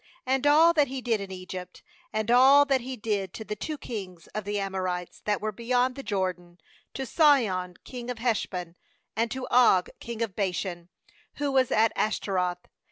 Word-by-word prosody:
and 265 +2 +1
all 320 +3 +6
that 295 -3 +3
He 265 +1 -4
did 230 -4 0
in 195 - -6
Egypt, 185 -1 -8 0.3
10and 215 +1 -1
all 275 +3 +7
that 270 -2 +2
He 260 +2 -5
did 205 -4 -2
to 220 - -6
the 210 - -4
two 305 +9 -5
kings 190 - -7
of 215 -2 -4
the 205 0 -1
Amorites, 185 -2 -3
that 210 -1 +1
were 215 0 -2
beyond 245 +4 +1
the 275 - -6
Jordan, 185 -6 -3 0.4
to 265 - -3
Sihon 225 - +3
king 245 -1 -8
of 250 - -3
Heshbon, 190 -7 -2 0.4
and 230 +2 0
to 255 +2 -4
Og 235 -7 +5
king 235 -1 -4
of 205 -5 -5
Bashan, 180 -3 -3 0.5
who 285 -1 -1
was 260 -2 +3
at 220 +1 +3
Ashtaroth. 180 -4 -1
215 Hz, 180 wpm, -27 LUFS, 185-255 Hz, 0.5 s, all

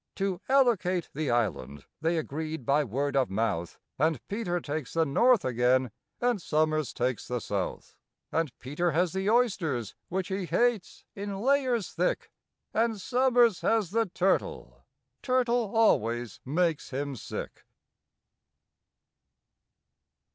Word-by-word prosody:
To 195 -2 -2
allocate 215 -10 +2
the 150 -1 -2
island 85 - -1 0.2
they 165 +1 +1
agreed 155 -2 -4
by 145 +4 +3
word 140 +3 -2
of 135 -2 +2
mouth, 95 -5 -1 0.2
And 155 -2 +2
PETER 195 -4 -1
takes 150 -3 -5
the 165 -1 +3
north 235 - +4
again, 125 0 +2 0.3
and 240 -5 +1
SOMERS 155 -2 +1
takes 125 -1 -2
the 125 -1 -2
south; 100 -4 -4 0.4
And 160 -4 0
PETER 150 +6 -1
has 175 +2 +1
the 190 +1 0
oysters, 180 - +1 0.2
which 185 0 -2
he 190 -1 -2
hates, 240 -3 0
in 200 -1 -5
layers 255 -3 +1
thick, - - -1 0.4
And 225 -1 +1
SOMERS 245 -2 +3
has 220 -6 +1
the 225 +1 +1
turtle—turtle 240 +5 -1
always 120 - +2
makes 165 +3 0
him 140 +1 -3
sick. 115 - -7
170 Hz, 120 wpm, -28 LUFS, 135-220 Hz, 0.4 s, north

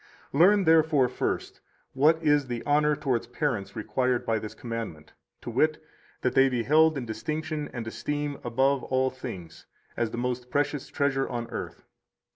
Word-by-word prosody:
109 165 +7 +6
Learn, 205 -2 +2
therefore, 160 -4 +4
first, 125 - -3 0.3
what 155 +5 +4
is 145 -2 +3
the 120 -2 -4
honor 150 +1 +3
towards 125 -5 -1
parents 125 -5 -2
required 120 +3 0
by 110 -1 +1
this 105 0 -8
commandment, 115 -10 -6 0.3
to - - -6
wit, 155 +6 +2 0.4
that 125 - 0
they 135 0 +5
be 125 -2 -1
held 155 +3 +4
in 130 - -4
distinction 150 +7 -4
and 120 -2 -5
esteem 145 +5 -3
above 130 +3 +2
all 130 0 +1
things, 90 -10 -9 0.3
as 115 - 0
the 120 - -6
most 125 0 -3
precious 145 0 -1
treasure 135 -2 0
on 120 -1 -3
earth. - - -6
130 Hz, 165 wpm, -27 LUFS, 120-150 Hz, 0.4 s, 109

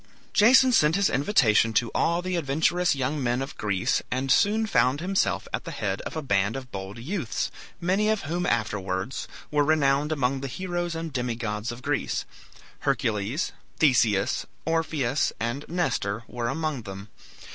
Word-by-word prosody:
Jason 255 +4 +6
sent 155 -8 +4
his 200 -1 +2
invitation 115 - +3
to 115 +1 +1
all 170 +1 +1
the 185 0 -2
adventurous 165 +3 +1
young 140 +2 -1
men 120 0 +1
of 135 +1 -5
Greece, 100 -3 0
and 130 +1 -1
soon 220 +2 +3
found 140 -9 +2
himself 190 +3 0
at - - -2
the - - -7
head 100 -1 -2
of - - -8
a 155 - -3
band 100 -3 +1
of 130 -2 -7
bold 95 +1 -6
youths, 145 - -3 0.3
many 190 +5 +1
of 220 -1 +1
whom 175 +4 -2
afterwards 105 -1 -2 0.2
were 150 -1 +3
renowned 145 -1 +2
among 135 -3 0
the 140 - -3
heroes 175 +2 -3
and 165 -2 -5
demigods 115 -3 -2
of 120 +2 -9
Greece. - - -1 0.5
Hercules, 110 - -1 0.3
Theseus, 115 -9 +2 0.2
Orpheus, 155 -5 0
and 120 +5 -2
Nestor 115 - -1
were 120 -1 -3
among 150 0 -2
them. 100 0 -9
135 Hz, 155 wpm, -26 LUFS, 115-165 Hz, 0.5 s, Jason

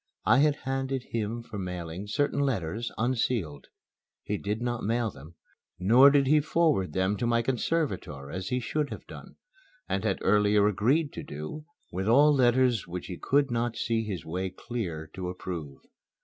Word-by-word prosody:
I - - +5
had 150 0 +4
handed 135 0 -2
him 115 +1 -3
for 110 -3 -7
mailing 90 +1 -5
certain 140 +8 0
letters, 115 - -1
unsealed. 110 - -1 0.6
He 105 - -2
did 105 +2 -2
not 120 -1 -2
mail 115 +1 0
them, 75 +4 -14 0.4
nor 120 +10 +7
did 140 -1 +4
he 150 +3 +5
forward 150 - +1
them 95 +2 +1
to 120 - -1
my 115 0 +2
conservator 115 - -2
as 95 +2 -4
he 125 - 0
should 145 +5 -2
have - - -8
done, - - -11 0.5
and 95 - -1
had 100 -4 +1
earlier 105 0 +4
agreed 130 - +1
to - - -5
do 75 - -7 0.3
with 95 +3 -3
all 145 +6 +6
letters 125 -5 +3
which 90 0 -5
he 90 - -6
could 140 -1 +2
not 120 -1 -1
see 115 0 0
his 100 -5 -5
way 90 +3 -3
clear 90 -6 -5
to 90 -1 -4
approve. 85 -6 -6
110 Hz, 170 wpm, -28 LUFS, 95-130 Hz, 0.6 s, nor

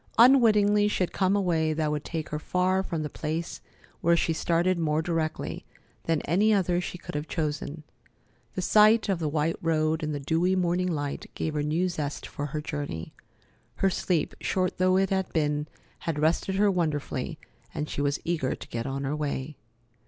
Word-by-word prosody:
Unwittingly, 210 -5 +6
she 210 - +1
had 180 - -3
come 190 0 +2
a 205 - +2
way 160 -4 +1
that 155 -1 0
would 150 -1 -2
take 160 -2 -4
her 150 - -3
far 185 +3 +1
from 165 -5 -3
the - - -2
place 160 +3 -4 0.4
where 170 +1 +4
she 165 - +1
started 170 +3 +1
more 155 -2 +1
directly 160 -1 -2 0.4
than 165 -2 +1
any 200 +8 +3
other 180 -3 +2
she 180 - -5
could - - -9
have 150 +1 -3
chosen. 155 -1 -3 0.7
The 185 - -2
sight 215 +3 +5
of 190 -3 +1
the 155 -3 -1
white 155 +2 0
road 160 -1 +1
in 155 -1 -2
the 145 - -2
dewy 165 +6 +1
morning 180 0 +1
light 145 -3 -3
gave 160 - -2
her 150 - 0
new 160 +5 +1
zest 150 -5 -4
for 145 - -5
her 150 +1 -4
journey. 145 - -5 0.6
Her 195 - +2
sleep, 175 -3 0
short 185 -2 -1
though 185 0 +4
it 195 0 +1
had 190 -1 0
been, 150 -1 0 0.3
had 165 -3 -3
rested 160 +5 +1
her 200 +1 +4
wonderfully, 155 -4 -2 0.3
and 150 -1 -3
she 145 - -3
was 145 0 0
eager 160 -6 0
to - - -11
get 115 +2 -3
on 135 +1 -3
her 140 +2 -1
way. 150 -1 -3
165 Hz, 190 wpm, -27 LUFS, 150-185 Hz, 0.7 s, Unwittingly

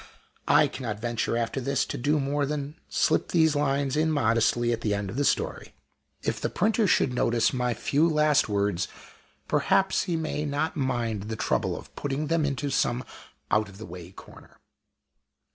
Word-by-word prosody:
I 150 +1 +5
cannot 115 -7 -5
venture, 115 0 -1
after 120 +3 -2
this, 135 +1 0
to - - -5
do 145 +4 +1
more 140 +1 0
than 145 0 -3 0.2
slip - - +2
these 160 -3 +3
lines 140 -1 0
in 160 +1 +2
modestly 120 -3 +2
at 115 - -3
the 105 -3 0
end 100 -1 -3
of - - -8
the 145 - +1
story. - - -1 0.5
If - - -2
the - - 0
printer 215 +2 +1
should 135 -7 +2
notice 120 0 +2
my 125 -2 0
few 155 +9 +2
last 150 -5 +3
words, 100 -3 0 0.6
perhaps 190 0 +2
he 175 - -1
may 155 -2 -2
not 145 +2 -1
mind 120 -7 -1
the 110 - -2
trouble - - 0
of - - -12
putting 145 +2 -2
them 165 -3 +2
into 140 0 -2
some 125 -1 +1 0.5
out 110 -1 +2
of 95 - -13
the 110 - -8
way 90 0 -9
corner. - - -15
135 Hz, 180 wpm, -27 LUFS, 115-150 Hz, 0.6 s, I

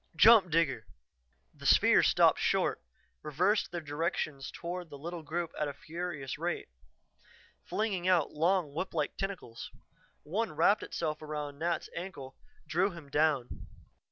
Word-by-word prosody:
"Jump, 210 +1 +7
Digger!" 145 -8 +1 0.7
The - - -6
spheres - - +6
stopped - - +4
short, - - +1 0.4
reversed 180 +8 +1
their 175 -1 -4
direction 150 -1 -2
toward 175 0 -6
the 145 - -9
little 170 +4 -6
group 165 +2 -3
at 150 - 0
a 140 - -5
furious 155 -3 -5
rate, - - -3 1.0
flinging 195 -5 -1
out 175 -5 +3
long, 165 -1 +1
whip 170 +3 -4
like 150 -2 -1
tentacles. 190 -12 -5 0.5
One 200 +6 -2
wrapped 170 +7 +4
itself 155 -2 -3
around 150 -2 -5
Nat's 170 +1 -1
ankle, 155 -7 -7 0.3
drew 175 +5 +2
him 165 -6 -11
down. 145 -5 0
165 Hz, 135 wpm, -31 LUFS, 150-180 Hz, 1.0 s, Jump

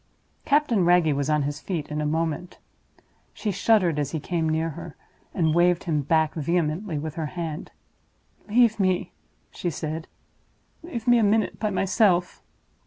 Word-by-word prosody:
Captain 280 - +3
Wragge 175 -3 +4
was 140 +1 -1
on 150 -1 +2
his 145 +1 -3
feet 165 -6 -4
in 150 0 -3
a 150 - 0
moment. 160 +2 -2 0.8
She 210 - -2
shuddered 185 -5 +2
as 145 -2 -1
he 160 - -3
came 165 +1 -1
near 160 +1 0
her, 165 +1 -9 0.4
and 160 -3 +1
waved 175 +1 +3
him 155 -4 0
back 160 +2 +1
vehemently 165 +2 -1
with 155 +1 -4
her 160 -2 -3
hand. 160 -2 -5 0.8
"Leave 230 0 +4
me!" 185 -2 +1 0.4
she 175 - -3
said; 160 +1 -5 0.7
"leave 245 -9 -7
me 240 -1 +6
a - - +3
minute 215 +1 +1
by 215 - 0
myself!" 190 -2 +1
170 Hz, 160 wpm, -25 LUFS, 155-195 Hz, 0.8 s, me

